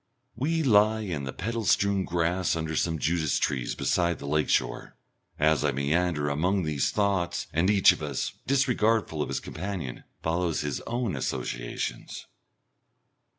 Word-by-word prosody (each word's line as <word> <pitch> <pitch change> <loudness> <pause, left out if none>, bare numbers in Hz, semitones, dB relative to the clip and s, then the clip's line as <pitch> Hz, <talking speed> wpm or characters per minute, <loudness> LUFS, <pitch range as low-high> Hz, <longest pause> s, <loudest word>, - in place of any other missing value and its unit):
We 160 +6 0
lie 110 -3 +4
in 85 -9 -3
the 65 - -4
petal 115 - -3
strewn 100 0 +2
grass 85 +1 0
under 80 -1 -3
some 80 +1 0
Judas 80 -1 0
trees 65 -4 -1
beside 85 -2 +1
the - - -9
lake 75 +1 0
shore, - - 0 0.4
as 75 -1 +3
I 75 - +2
meander 75 +3 0
among 90 +7 +1
these 75 -4 0
thoughts, 95 -4 0
and 85 +4 +2
each 100 -2 +6
of - - -5
us, 70 -3 -2 0.2
disregardful 115 - +2
of - - -2
his - - -1
companion, 90 -10 -5 0.2
follows 85 0 0
his 75 -1 -3
own 120 -6 -1
associations. - - -4
85 Hz, 150 wpm, -27 LUFS, 75-100 Hz, 0.4 s, each